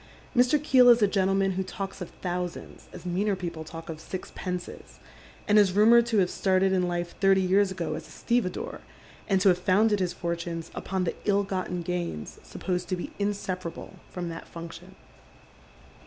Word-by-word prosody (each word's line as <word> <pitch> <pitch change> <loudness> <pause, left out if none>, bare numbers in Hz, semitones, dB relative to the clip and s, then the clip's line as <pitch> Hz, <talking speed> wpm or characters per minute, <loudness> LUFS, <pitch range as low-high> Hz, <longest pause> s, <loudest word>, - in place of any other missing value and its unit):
Mr. 250 +4 +5
Keel 260 -4 +6
is 235 -2 +6
a - - +6
gentleman 195 0 +2
who 190 0 -1
talks 195 +1 -6
of 180 - -5
thousands 180 -1 -4
as 180 -1 -11
nieaner 190 +3 0
people 170 -3 -5
talk 165 +1 -9
of 160 -2 -6
sixpences, 180 - -6 0.5
and 210 +1 +6
is 195 -3 +4
rumoured 230 +3 +6
to 230 -2 +1
have 185 -3 +3
started 190 0 +2
in 180 -1 +2
life 175 0 -3
thirty 195 0 +5
years 190 +2 +3
ago 170 -4 -3
as - - -6
a - - -18
stevedore, 235 -6 -2 0.5
and 195 -2 +3
to 195 - +6
have 180 -1 +3
founded 205 +3 +3
his 180 -2 -1
iortunes 170 -1 -4
upon 190 -1 -2
the 175 - -1
ill 200 -1 +3
gotten 185 -2 -3
gains 170 - -4
supposed 180 -1 -3
to 185 - +1
be 175 - -6
inseparable 185 -4 -4 0.2
Irom 175 -2 -3
that 165 0 -8
function. 170 0 -10
185 Hz, 175 wpm, -27 LUFS, 175-200 Hz, 0.5 s, Keel